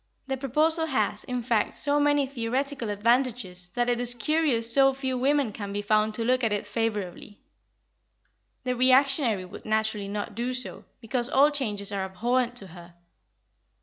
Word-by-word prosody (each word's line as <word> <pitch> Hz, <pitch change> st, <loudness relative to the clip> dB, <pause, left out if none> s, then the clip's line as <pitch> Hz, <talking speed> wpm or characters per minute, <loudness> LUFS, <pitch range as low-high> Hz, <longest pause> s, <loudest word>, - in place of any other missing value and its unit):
The 270 Hz, 0 st, -2 dB
proposal 310 Hz, +5 st, +1 dB
has, 270 Hz, -3 st, -1 dB
in 250 Hz, -2 st, -3 dB
fact, 225 Hz, -3 st, 0 dB
so 290 Hz, -1 st, +2 dB
many 290 Hz, -1 st, +3 dB
theoretical 260 Hz, 0 st, -3 dB
advantages 215 Hz, -4 st, 0 dB
that 245 Hz, 0 st, +1 dB
it 245 Hz, 0 st, 0 dB
is 245 Hz, 0 st, +4 dB
curious 250 Hz, -5 st, +1 dB
so 270 Hz, 0 st, +5 dB
few 265 Hz, -1 st, -2 dB
women 265 Hz, -2 st, +1 dB
can 200 Hz, -1 st, -6 dB
be 205 Hz, +1 st, -3 dB
found 215 Hz, +1 st, +1 dB
to 230 Hz, -, -2 dB
look 255 Hz, +1 st, +1 dB
at 225 Hz, -, +1 dB
it 205 Hz, 0 st, -1 dB
favourably. 205 Hz, -2 st, -4 dB, 1.2 s
The 250 Hz, 0 st, -1 dB
reactionary 255 Hz, -, +3 dB
would 180 Hz, -, -11 dB
naturally 215 Hz, -2 st, -1 dB
not 205 Hz, +1 st, -4 dB
do 240 Hz, +4 st, -2 dB
so, 255 Hz, -, -3 dB, 0.2 s
because 240 Hz, +2 st, -1 dB
all 285 Hz, +1 st, +4 dB
changes 210 Hz, -8 st, 0 dB
are 195 Hz, -1 st, -2 dB
abhorrent 240 Hz, +6 st, -1 dB
to 200 Hz, -5 st, -6 dB
her. 175 Hz, -1 st, -13 dB
240 Hz, 165 wpm, -26 LUFS, 210-270 Hz, 1.2 s, so